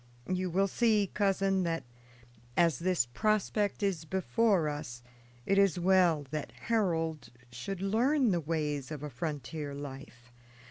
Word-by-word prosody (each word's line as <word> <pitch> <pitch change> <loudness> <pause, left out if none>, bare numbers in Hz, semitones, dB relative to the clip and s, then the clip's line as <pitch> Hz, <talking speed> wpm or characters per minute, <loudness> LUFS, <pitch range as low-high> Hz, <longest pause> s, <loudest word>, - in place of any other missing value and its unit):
You 185 0 -1
will 195 +3 +2
see, 210 -2 +2
cousin, 195 -1 +2
that, 165 -2 -1 0.7
as 165 -6 +3
this 180 -7 +2
prospect 205 - 0
is 190 -5 0
before 190 +1 +1
us, 145 -5 -5 0.4
it 195 0 +3
is 195 -3 +4
well 175 -4 +3
that 155 -2 -4
Harold 165 - -1 0.2
should 180 +11 -5
learn 245 +5 +2
the 175 - +1
ways 150 -3 -2
of 150 -2 -6
a 150 - -5
frontier 145 +2 -4
life. 135 -3 -9
170 Hz, 135 wpm, -31 LUFS, 150-195 Hz, 0.7 s, is